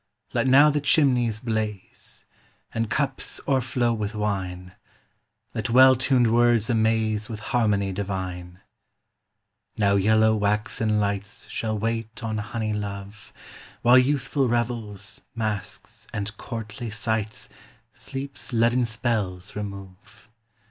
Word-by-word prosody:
Let - - +1
now 140 +4 +7
the 145 0 0
chimneys 125 -7 +3
blaze, 110 -4 -4 0.5
And 115 -1 -1
cups 135 +2 -1
o'erflow 125 -3 +1
with 105 -1 -3
wine; 95 -4 -3 0.8
Let 110 +2 -3
well 130 +2 +8
tuned 125 -2 +2
words 120 -1 +3
amaze 110 -1 +1
With 110 -2 -5
harmony 105 -5 +2
divine. 95 -2 -5 1.2
Now 100 -1 +3
yellow 110 +2 +4
waxen 105 +1 0
lights 100 0 -3
Shall 110 -1 -2
wait 115 +1 -3
on 110 -1 -2
honey 110 0 -3
love, 100 0 -6 0.5
While 125 +2 +7
youthful 135 0 +1
revels, 115 -4 -3
masques, 110 -4 -4
and 105 +1 -4
courtly 115 -1 -6
sights 110 0 -2 0.5
Sleep's 135 0 -7
leaden 120 +1 +3
spells 110 -4 -2
remove. 100 +2 -9
110 Hz, 110 wpm, -25 LUFS, 105-120 Hz, 1.2 s, well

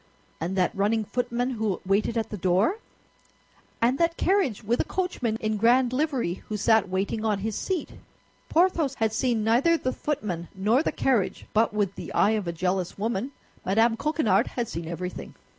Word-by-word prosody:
"And 175 +4 -3
that 185 -2 +1
running 210 +2 +1
footman 245 +2 -1
who 220 -5 -1
waited 205 +4 +1
at 225 -1 -2
the - - -3
door, 190 - +1 1.0
and 245 +4 +2
that 335 0 +1
carriage 370 - +1
with 230 +4 0
a - - +3
coachman 270 -12 -2
in 215 -1 -1
grand 245 +3 +3
livery 260 - -1
who 215 - -2
sat 220 -1 +3
waiting 195 +4 -1
on 215 -2 +1
his 220 -2 -2
seat?" 370 -5 -2 0.6
Porthos 330 -5 +2
had 220 -2 0
seen 230 -1 +1
neither 250 +10 +3
the 255 -4 -2
footman 190 - -3
nor 215 +8 +2
the - - -1
carriage, 245 -8 0
but 225 +1 +3
with 205 -2 0
the - - -8
eye 210 - +4
of 215 -4 -1
a - - 0
jealous 180 +1 -2
woman, 225 +4 -2 0.3
Mme. 225 +4 +3
Coquenard 305 -1 +1
had 240 -2 -3
seen 165 -3 -5
everything. 180 +2 -6
220 Hz, 175 wpm, -26 LUFS, 195-255 Hz, 1.0 s, eye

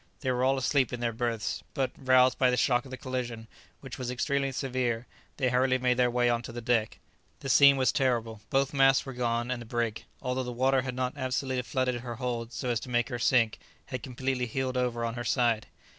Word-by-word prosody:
They 130 -3 0
were 125 0 0
all 135 +1 +3
asleep 130 0 +1
in 125 - -4
their 120 -1 -1
berths, 115 -2 -2
but, 135 -1 0
roused 130 -1 +4
by 130 - +5
the 125 - +1
shock 125 0 +2
of - - -11
the 130 - -6
collision, 120 -3 -4 0.3
which - - -8
was 125 -1 -3
extremely 135 +2 0
severe, 125 -3 -2 0.3
they 130 -3 +1
hurriedly 130 +1 +2
made 125 -1 +1
their 125 -1 +3
way 120 0 +2
on 120 -1 +1
to 120 - -8
the 120 - -6
deck. 115 -2 0 0.4
The 135 - -5
scene 140 +1 +7
was 130 -1 +3
terrible; 115 -5 0
both 135 +1 +1
masts 135 -1 +4
were 135 - -6
gone, 120 0 -1
and 125 -1 -3
the - - -8
brig, 115 -2 -2
although 125 +1 -2
the 125 -1 -4
water 130 +2 +2
had 125 -1 -5
not 125 0 -1
absolutely 130 -1 -1
flooded 125 -1 -1
her 120 -1 -6
hold 120 -1 -3
so 125 0 -4
as 120 -2 +1
to 125 - -9
make 120 +1 +1
her 120 -2 -4
sink, 115 -3 +2 0.3
had 130 -2 -5
completely 130 -1 -2
heeled 130 +2 -2
over 120 -2 0
on 115 - -2
her 120 0 -5
side. 120 -4 +1
125 Hz, 230 wpm, -29 LUFS, 120-130 Hz, 0.4 s, scene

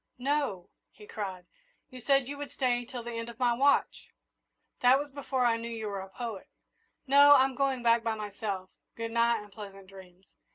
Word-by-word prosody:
"No!" 255 -9 -2 0.2
he 210 - -16
cried. 190 -4 -6 0.5
"You 255 -1 -10
said 275 0 +2
you 285 - -5
would 290 - -6
stay 245 -2 0
till 245 -1 -7
the 240 - -6
end 230 0 -5
of 235 - -11
my 245 -1 +2
watch!" 280 +4 +2 0.7
"That 250 +1 +5
was 290 0 -5
before 265 -2 -1
I 230 -1 +3
knew 230 +1 -6
you 225 -2 -5
were 200 -2 -4
a 190 - -10
poet. 225 -1 -6 0.6
No, 285 +1 +7
I'm 265 0 +4
going 270 -2 0
back 230 0 +4
by 225 -1 -1
myself 205 -3 -5 0.2
good 230 0 -5
night, 235 -1 +2
and 205 - -16
pleasant 195 -2 -10
dreams!" 190 -1 -15
235 Hz, 195 wpm, -29 LUFS, 205-260 Hz, 0.7 s, No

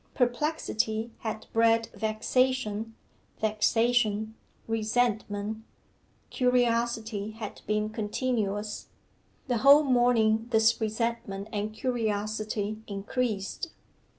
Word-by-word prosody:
Perplexity 240 -4 0
had 220 -1 -4
bred 230 0 +3
vexation; 220 +1 0 0.4
vexation, 220 0 +2 0.3
resentment; 220 -1 -1 0.7
curiosity 235 -4 +1
had 220 -2 -7
been 210 0 +1
continuous. 210 -1 -2 0.6
The 245 -3 0
whole 280 +5 +8
morning 240 -4 +3
this 225 0 +3
resentment 220 -2 -2
and 210 +1 -2
curiosity 215 -2 -2
increased. 210 - -2
220 Hz, 75 wpm, -28 LUFS, 215-240 Hz, 0.7 s, whole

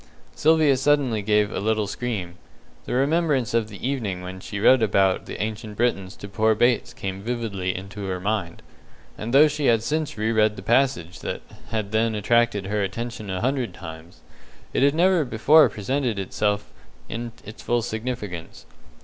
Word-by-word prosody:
Sylvia 155 -3 +4
suddenly 135 -5 +2
gave 105 0 +2
a - - -3
little 110 +1 +1
scream. 100 -6 -4 0.5
The - - -4
remembrance 140 -3 +1
of 115 -2 +1
the 105 +4 -5
evening 105 -10 -2
when 95 +1 -7
she 100 +2 -6
read 125 +4 +5
about 95 -3 +2
the - - -6
Ancient 110 0 -4
Britons 100 -5 0
to 100 - -9
poor 110 +2 +2
Bates 120 +2 +2
came 95 0 -5
vividly 105 -5 -2
into 100 +2 -7
her 95 -1 -3
mind, 100 -3 -2 0.5
and 110 +2 -5
though 145 +4 +7
she 150 -1 -1
had 115 -2 +3
since 155 0 -2
re 110 +2 0
read 110 -1 +3
the - - -9
passage 120 -9 +1
that - - -5 0.3
had 110 -2 -3
then 110 0 +1
attracted 105 -1 +2
her 105 +2 -1
attention 110 +2 -4
a 95 -1 -2
hundred 125 -6 -1
times, 80 +1 -10 0.5
it - - +1
had 140 +2 +4
never 180 0 +4
before 140 +5 +5
presented 120 +1 -2
itself 105 +1 0 0.5
to - - -7
her 115 - -3
in 120 - -7
its 105 +2 -10
full 120 -1 0
significance. 110 -7 -5
110 Hz, 175 wpm, -24 LUFS, 100-125 Hz, 0.5 s, though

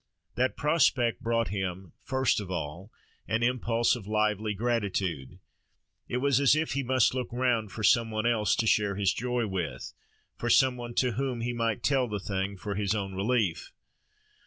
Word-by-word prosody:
That 130 +1 0
prospect 135 -6 +2
brought 115 0 0
him, 95 -2 -4
first 130 -4 +1
of 100 -3 -7
all, 90 +4 -5 0.4
an 115 +3 0
impulse 120 -1 +1
of 110 -5 -9
lively 105 0 0
gratitude: 100 - -2 0.7
it 125 - -2
was 140 0 +2
as 140 +1 +5
if 155 +1 -1
he 140 - 0
must 130 -2 +2
look 125 -2 -3
round 120 -3 0
for 110 - -6
some 115 0 +4
one 110 0 -2
else 110 -4 +2
to 115 - 0
share 105 -2 +2
his 100 -2 +1
joy 125 0 -1
with: 95 -5 -4 0.4
for - - -3
some 130 -1 +5
one 120 -1 -7
to 125 -1 +2
whom 125 0 -2
he 120 +1 -2
might 115 -3 -1
tell 135 -3 +2
the 105 -2 -3
thing, 95 0 -3
for 100 +3 -4
his 100 0 0
own 100 -2 -3
relief. 100 -2 -1
115 Hz, 180 wpm, -28 LUFS, 100-125 Hz, 0.7 s, as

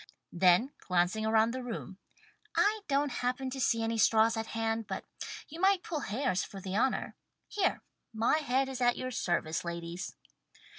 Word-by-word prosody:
Then, 180 +8 +4
glancing 185 +4 +1
around 220 +1 +4
the 260 +1 -4
room 225 -5 -6 0.6
"I 425 +1 +3
don't 280 0 +1
happen 255 +1 -1
to 265 - -5
see 230 -1 +2
any 225 0 -1
straws 225 +2 +5
at 225 0 -3
hand, 225 -1 -2
but - - -4 0.4
you 320 +3 -9
might 385 0 +3
pull 315 - -3
hairs 235 -4 -1
for 195 - -8
the 190 0 -5
honour. 255 +5 +1 0.3
Here! 405 -3 0 0.3
My 230 +7 +2
head 270 -2 +1
is 260 -1 -5
at 245 0 +3
your 255 0 -3
service, 170 -7 -1
ladies." 170 +1 -5
230 Hz, 165 wpm, -31 LUFS, 195-265 Hz, 0.6 s, straws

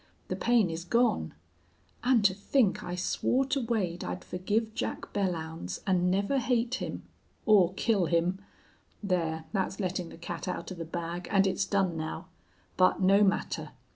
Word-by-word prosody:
The - - -1
pain 235 -7 +3
is 165 +1 -4
gone. 235 +7 +1 0.7
And 245 -4 +3
to 190 - +5
think 205 +2 +1
I 180 - -4
swore 250 +8 +1
to 275 +1 0
Wade 200 -7 -1
I'd 90 0 -4
forgive 215 +5 -1
Jack - - -4
Belllounds 160 - -3
and 180 -2 +2
never 200 +9 +1
hate 245 0 0
him - - -4 0.4
or 190 -4 +5
kill 200 -5 +2
him!... 175 +4 +1 0.6
There, 165 -5 -1
that's 195 0 -1
letting 180 -3 -2
the - - -11
cat 170 - -6
out 180 - -4
of 180 - -7
the 165 - -4
bag, 170 +1 -4
and 195 -1 +4
it's 195 +1 +1
done 195 -4 +1
now. 160 +2 -5 0.5
But 185 0 +4
no 195 +2 +5
matter. 195 -1 0
190 Hz, 165 wpm, -29 LUFS, 175-210 Hz, 0.7 s, to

